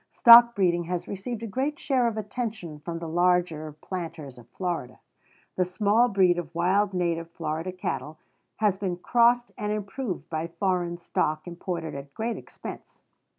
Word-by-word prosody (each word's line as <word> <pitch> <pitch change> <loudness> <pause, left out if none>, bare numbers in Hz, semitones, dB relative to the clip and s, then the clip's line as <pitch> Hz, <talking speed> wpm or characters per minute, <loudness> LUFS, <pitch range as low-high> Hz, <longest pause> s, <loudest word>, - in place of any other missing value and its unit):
Stock 235 0 +8
breeding 175 -3 +2
has 180 0 -3
received 215 +4 -5
a - - -3
great 270 +8 -2
share 255 -4 +1
of 225 -2 -2
attention 210 -7 -5
from 165 +2 -5
the 165 0 -6
larger 175 -2 +1
planters 165 -8 -6
of 120 - -17
Florida. 170 -9 -4 0.6
The 185 - +4
small 205 +6 +2
breed 185 -5 +3
of 165 -1 -8
wild 190 +4 +2
native 170 -2 -1
Florida 165 +2 -4
cattle 160 -4 -4 0.4
has 205 -3 +1
been 185 -3 -2
crossed 240 +5 +3
and 210 0 -2
improved 210 +1 -4
by 160 0 -3
foreign 175 0 -1
stock 155 -2 -1
imported 170 -1 -4
at 140 0 -9
great 230 +1 -2
expense. - - -10
180 Hz, 155 wpm, -26 LUFS, 165-210 Hz, 0.6 s, Stock